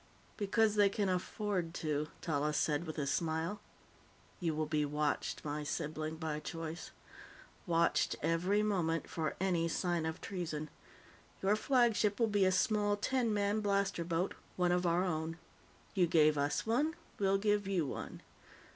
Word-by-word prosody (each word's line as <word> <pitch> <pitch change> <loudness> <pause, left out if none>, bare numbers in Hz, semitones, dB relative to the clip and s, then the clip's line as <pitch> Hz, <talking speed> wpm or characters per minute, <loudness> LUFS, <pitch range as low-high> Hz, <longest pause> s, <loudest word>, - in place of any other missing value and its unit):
"Because 215 +1 +2
they 205 -1 +6
can 200 -1 0
afford 180 -1 -2
to," 150 -2 -1
Tallis 150 -2 0
said 150 +2 0
with 155 - -5
a 145 - -1
smile. 160 +6 -1 0.8
"You 165 -3 -1
will 155 0 0
be 150 -1 0
watched, 150 +1 -1
my 150 0 -2
sibling 155 +1 -3
by 160 -2 -3
choice. 165 +1 -6 0.8
Watched 170 -1 +2
every 180 +6 +2
moment, 165 -7 0
for 160 -2 -2
any 175 -3 +1
sign 170 -1 0
of 160 - -4
treason. 155 -5 -4 0.7
Your 200 +2 +4
flagship 225 -3 +2
will 230 - +5
be 205 -3 +2
a 185 - +4
small 205 +1 +2
ten 240 +2 +1
man 205 0 +1
blaster 200 -3 0
boat 170 +2 -1 0.2
one 180 -1 +2
of 180 0 +2
our 170 +2 +3
own. 160 -2 -2 0.6
You 180 -3 +3
gave 155 -2 +5
us 145 0 0
one; 290 +9 +1 0.2
we'll 195 -1 +3
give 205 0 +1
you 185 -5 +1
one. - - -6
175 Hz, 155 wpm, -34 LUFS, 160-205 Hz, 0.8 s, they